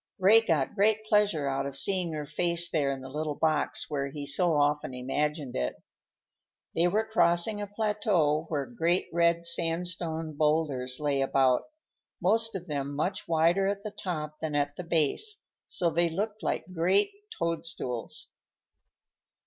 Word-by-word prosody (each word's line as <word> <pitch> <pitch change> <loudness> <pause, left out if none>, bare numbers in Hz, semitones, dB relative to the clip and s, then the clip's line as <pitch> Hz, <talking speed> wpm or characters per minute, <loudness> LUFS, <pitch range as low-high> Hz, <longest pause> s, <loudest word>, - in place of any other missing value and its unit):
Ray 205 +4 +6
got 160 -10 0
great 215 +1 +2
pleasure 210 -9 +2
out 135 0 -1
of 140 -1 -6
seeing 185 0 +1
her 150 -1 -4
face 170 +3 0
there 145 -4 +1
in 135 -1 -5
the 130 - -8
little 150 +2 -3
box 155 -1 0
where 140 -2 -2
he 145 +1 -6
so 165 +3 +2
often 145 -2 +1
imagined 145 +2 -2
it. 60 -1 -1 1.0
They 170 +2 +3
were 215 +5 +1
crossing 205 -1 +2
a 205 - -4
plateau 200 -7 +1
where 145 -3 -1
great 175 -6 0
red 170 0 +2
sandstone 165 -1 -1
boulders 145 -5 0
lay 145 -2 0
about, 135 -1 +2 0.5
most 225 +4 +2
of 180 -2 -5
them 140 -3 -3
much 180 +6 -2
wider 170 +4 +3
at 200 0 -2
the 215 - -5
top 155 -6 -5
than 155 -2 -3
at 145 0 0
the 180 - -6
base, 170 - 0 0.3
so 175 -3 0
that - - -10
they 170 0 +4
looked 210 +5 -3
like 185 - -3
great 185 - +2 0.3
toadstools. 165 -8 -3
165 Hz, 155 wpm, -28 LUFS, 145-185 Hz, 1.0 s, Ray